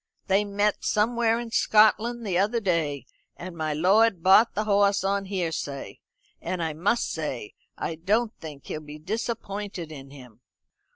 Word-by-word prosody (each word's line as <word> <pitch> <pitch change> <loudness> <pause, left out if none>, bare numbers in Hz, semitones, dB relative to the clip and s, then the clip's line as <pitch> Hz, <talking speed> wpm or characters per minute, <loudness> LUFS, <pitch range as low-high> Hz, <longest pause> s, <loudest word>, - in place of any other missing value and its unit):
They 195 +2 +2
met 205 0 0
somewhere 230 +1 +1
in 235 -1 -6
Scotland 225 +2 +3
the 190 -4 -1
other 205 +6 +2
day 160 - -1 0.3
and 180 0 -8
my 155 -1 -2
lord 190 +3 +3
bought 205 +5 +5
the 215 - 0
hoss 200 -2 +2
on 195 0 0
hearsay; 165 -7 -4 0.4
and 180 -2 -3
I 160 -1 -2
must 200 +10 0
say 135 -9 -5 0.2
I - - -3
don't 210 +8 0
think 150 -4 -10
he'll 155 - -5
be 150 0 -10
disappointed 200 -2 -4
in 135 -3 -10
him." 125 -5 -14
195 Hz, 155 wpm, -26 LUFS, 160-215 Hz, 0.4 s, bought